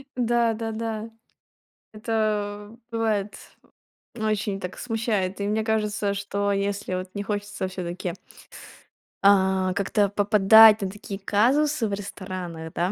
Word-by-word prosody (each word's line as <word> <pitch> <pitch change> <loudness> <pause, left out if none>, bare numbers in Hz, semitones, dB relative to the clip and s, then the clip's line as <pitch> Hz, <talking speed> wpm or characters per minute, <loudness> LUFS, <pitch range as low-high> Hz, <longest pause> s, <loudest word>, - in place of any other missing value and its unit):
Да-да-да. 225 -2 -1 0.8
Это, 210 -2 -2
э, - - -15
бывает, 215 -3 -1 0.8
очень 215 -3 -1
так 180 0 -7
смущает. 215 -5 -2
И 200 - -1
мне 215 +1 0
кажется, 210 -2 0
что 200 0 -2
если 200 -1 -2
вот 185 0 -4
не 200 - -3
хочется 205 -1 -3
всё-таки 180 -1 -5 1.1
а 190 -1 +4
как-то 200 +1 +1
попадать 210 +2 +6
на 195 - -1
такие 200 0 -8
казусы 250 +7 +2
в 205 - -4
ресторанах, 185 -5 -6
да, 175 +2 0
205 Hz, 115 wpm, -25 LUFS, 195-220 Hz, 1.1 s, попадать